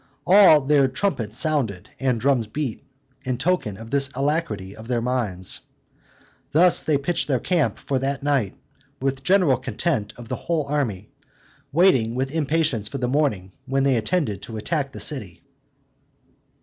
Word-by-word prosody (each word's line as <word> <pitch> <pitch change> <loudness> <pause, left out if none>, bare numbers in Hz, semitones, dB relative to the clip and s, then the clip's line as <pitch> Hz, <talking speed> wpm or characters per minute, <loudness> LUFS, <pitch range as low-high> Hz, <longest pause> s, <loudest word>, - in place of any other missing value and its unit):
All 185 -5 +7
their 140 0 +3
trumpets 130 - -2
sounded, 125 - +1
and 130 -3 0
drums 125 -2 +1
beat, 130 0 -4 0.4
in 130 -2 -2
token 140 - -1
of 115 +1 -11
this 140 -1 +2
alacrity 135 - -2
of 110 +1 -11
their 120 -1 0
minds. 115 -7 -2 0.9
Thus 175 +3 +5
they 150 -2 +1
pitched 155 +5 -1
their 135 -4 +1
camp 155 - 0
for 135 -2 -2
that 135 +1 -2
night, 140 -9 0 0.4
with 135 0 -2
general 180 -8 +3
content 125 -5 -2
of 120 -1 -10
the - - -3
whole 165 -4 -2
army, 125 -9 -2 0.6
waiting 130 -9 +3
with 135 +2 -2
impatience 150 -8 0
for 140 - -5
the 125 -2 -1
morning, 125 -9 0 0.2
when 135 +1 +1
they 135 -2 +3
intended 110 - -1
to 115 - -8
attack 140 +4 -2
the - - -9
city. 105 - -2
135 Hz, 155 wpm, -23 LUFS, 115-150 Hz, 0.9 s, All